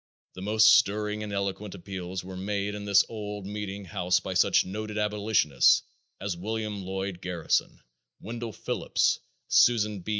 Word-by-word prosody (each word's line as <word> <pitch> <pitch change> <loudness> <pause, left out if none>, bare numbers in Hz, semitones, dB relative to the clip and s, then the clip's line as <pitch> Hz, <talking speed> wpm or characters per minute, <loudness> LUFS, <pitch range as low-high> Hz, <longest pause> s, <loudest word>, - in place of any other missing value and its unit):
The 95 - -9
most 110 +2 +3
stirring 105 +1 +2
and 105 -1 -5
eloquent 100 0 -3
appeals 95 0 -6
were 95 0 -8
made 100 +2 -2
in 105 0 -6
this 100 -1 +5
old 105 -3 -6
meeting 100 -1 -5
house 90 -2 +1
by 95 - -5
such 90 - +4
noted 105 +3 -5
abolitionists 105 - +3 0.4
as 100 -2 -3
William 105 +2 -4
Lloyd 95 -1 -4
Garrison, 90 -2 -1 0.4
Wendell 115 0 -6
Phillips, - - 0 0.3
Susan 105 -4 +4
B. 90 - -9
100 Hz, 145 wpm, -27 LUFS, 95-105 Hz, 0.4 s, this